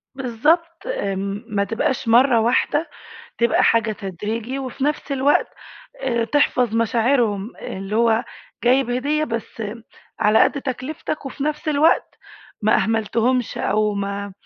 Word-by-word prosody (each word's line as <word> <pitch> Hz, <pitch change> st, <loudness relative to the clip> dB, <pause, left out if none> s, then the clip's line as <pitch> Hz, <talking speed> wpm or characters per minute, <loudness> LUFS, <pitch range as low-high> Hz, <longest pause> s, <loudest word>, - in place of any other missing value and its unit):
بالضبط، 315 Hz, -, 0 dB
آمم، 200 Hz, -, -3 dB
ما 200 Hz, -1 st, 0 dB
تبقاش 225 Hz, +4 st, -2 dB
مَرّة 240 Hz, +1 st, +5 dB
واحدة، 260 Hz, +7 st, +1 dB, 0.5 s
تبقى 235 Hz, 0 st, +3 dB
حاجة 230 Hz, -1 st, +3 dB
تدريجي، 215 Hz, +6 st, -4 dB
وفي 265 Hz, 0 st, -5 dB
نفس 295 Hz, 0 st, -1 dB
الوقت 275 Hz, +2 st, +2 dB, 0.6 s
آآ 235 Hz, -3 st, 0 dB
تحفظ 250 Hz, -4 st, +1 dB
مشاعرهم، 230 Hz, -2 st, +1 dB
اللي 195 Hz, +2 st, -5 dB
هو 230 Hz, +1 st, +3 dB, 0.4 s
جايب 250 Hz, 0 st, +3 dB
هدية 290 Hz, +5 st, 0 dB
بس 230 Hz, -2 st, -5 dB, 0.6 s
على 215 Hz, +1 st, +5 dB
قد 280 Hz, -, -1 dB
تكلفتك، 280 Hz, +3 st, -4 dB
وفي 270 Hz, +1 st, -5 dB
نفس 305 Hz, +1 st, -2 dB
الوقت 305 Hz, +2 st, +2 dB, 0.4 s
ما 215 Hz, -, +4 dB
أهملتهُمش، 225 Hz, +3 st, 0 dB
أو 210 Hz, +1 st, +1 dB
ما 200 Hz, 0 st, -4 dB
235 Hz, 125 wpm, -21 LUFS, 215-275 Hz, 0.6 s, مَرّة